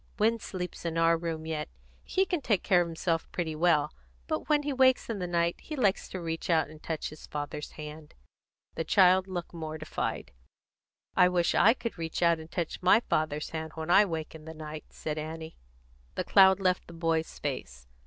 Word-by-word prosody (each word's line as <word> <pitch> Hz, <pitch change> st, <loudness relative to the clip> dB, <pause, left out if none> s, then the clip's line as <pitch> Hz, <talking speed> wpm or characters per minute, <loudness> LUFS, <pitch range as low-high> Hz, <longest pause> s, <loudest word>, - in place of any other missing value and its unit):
"Win 225 Hz, +1 st, +2 dB
sleeps 180 Hz, -4 st, -6 dB
in 165 Hz, -1 st, -2 dB
our 165 Hz, 0 st, +4 dB
room 165 Hz, -1 st, -4 dB
yet. 155 Hz, -1 st, -3 dB, 0.3 s
He 380 Hz, 0 st, +1 dB
can 355 Hz, -5 st, -1 dB
take 210 Hz, -8 st, +1 dB
care 180 Hz, -3 st, +4 dB
of 175 Hz, -, -1 dB
himself 165 Hz, 0 st, -2 dB
quite 160 Hz, -3 st, -3 dB
well. 155 Hz, -4 st, +3 dB, 0.3 s
But -, -, -3 dB
when 295 Hz, -1 st, +3 dB
he 290 Hz, -1 st, -1 dB
wakes 260 Hz, -2 st, +3 dB
in 210 Hz, -, -4 dB
the 180 Hz, -, -2 dB
night 170 Hz, 0 st, +1 dB
he 310 Hz, -, -6 dB
likes 205 Hz, -8 st, +1 dB
to 185 Hz, -, -5 dB
reach 165 Hz, +2 st, -4 dB
out 160 Hz, -3 st, +3 dB
and 155 Hz, 0 st, -13 dB
touch 160 Hz, -2 st, -3 dB
his 155 Hz, -, -12 dB
father's 150 Hz, 0 st, -5 dB
hand." 150 Hz, 0 st, -9 dB, 0.6 s
The -, -, -2 dB
child 185 Hz, +1 st, +5 dB
looked 175 Hz, -3 st, -5 dB
mortified. 155 Hz, -, -4 dB, 0.8 s
"I 180 Hz, -, +6 dB
wish 175 Hz, -1 st, +2 dB
I 225 Hz, +4 st, +5 dB
could 230 Hz, -7 st, -5 dB
reach 165 Hz, +1 st, -2 dB
out 170 Hz, -1 st, +4 dB
and 160 Hz, 0 st, -10 dB
touch 170 Hz, -2 st, -3 dB
my 185 Hz, +5 st, +5 dB
father's 155 Hz, -6 st, -1 dB
hand 160 Hz, 0 st, -5 dB
when 160 Hz, +1 st, -3 dB
I 205 Hz, +3 st, +7 dB
wake 160 Hz, -4 st, -4 dB
in 155 Hz, -1 st, -11 dB
the 160 Hz, 0 st, -8 dB
night," 155 Hz, 0 st, -7 dB
said 155 Hz, 0 st, -4 dB
Annie. 160 Hz, +1 st, -6 dB, 0.6 s
The -, -, -1 dB
cloud 190 Hz, -1 st, +6 dB
left 185 Hz, -2 st, +1 dB
the 170 Hz, -, -11 dB
boy's 165 Hz, -1 st, -1 dB
face. -, -, -5 dB
165 Hz, 200 wpm, -29 LUFS, 160-185 Hz, 0.8 s, I